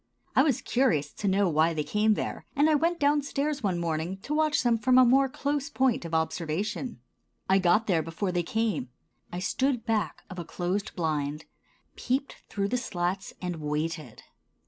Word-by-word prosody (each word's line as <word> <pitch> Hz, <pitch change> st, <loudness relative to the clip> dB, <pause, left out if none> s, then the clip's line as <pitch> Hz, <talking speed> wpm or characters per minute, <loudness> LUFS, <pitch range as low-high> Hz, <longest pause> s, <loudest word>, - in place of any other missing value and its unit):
I -, -, +7 dB
was 275 Hz, -4 st, +1 dB
curious 160 Hz, -, +1 dB
to 205 Hz, -, -3 dB
know 195 Hz, +1 st, +3 dB
why 160 Hz, 0 st, +2 dB
they 150 Hz, -, 0 dB
came 210 Hz, +5 st, +2 dB
there, -, -, -4 dB
and 290 Hz, +2 st, +4 dB
I 315 Hz, -, +4 dB
went 335 Hz, +3 st, +1 dB
down 290 Hz, 0 st, +3 dB
stairs 285 Hz, +1 st, -2 dB
one 190 Hz, -5 st, 0 dB
morning 170 Hz, +2 st, -2 dB
to 295 Hz, -, -3 dB
watch 305 Hz, -2 st, +2 dB
them 235 Hz, -2 st, +3 dB
from 255 Hz, +3 st, +4 dB
a 255 Hz, -, +8 dB
more 270 Hz, +2 st, +4 dB
close 285 Hz, +2 st, -2 dB
point 260 Hz, -, +1 dB
of 165 Hz, -1 st, -3 dB
observation. 160 Hz, -, -2 dB, 0.5 s
I 190 Hz, +1 st, +4 dB
got 185 Hz, +4 st, +3 dB
there 175 Hz, -6 st, +2 dB
before 165 Hz, +4 st, -3 dB
they 175 Hz, -1 st, +1 dB
came. 215 Hz, -, -1 dB, 0.4 s
I 175 Hz, -, -4 dB
stood 245 Hz, +6 st, 0 dB
back 215 Hz, -8 st, -1 dB
of 185 Hz, -2 st, -8 dB
a -, -, -3 dB
closed 180 Hz, +5 st, -3 dB
blind, 155 Hz, -2 st, -2 dB, 0.5 s
peeped 265 Hz, +3 st, -2 dB
through 200 Hz, -1 st, -1 dB
the 250 Hz, -, +1 dB
slats 180 Hz, -4 st, -3 dB
and 180 Hz, -2 st, -2 dB
waited. 150 Hz, -3 st, -3 dB
195 Hz, 185 wpm, -28 LUFS, 165-260 Hz, 0.5 s, a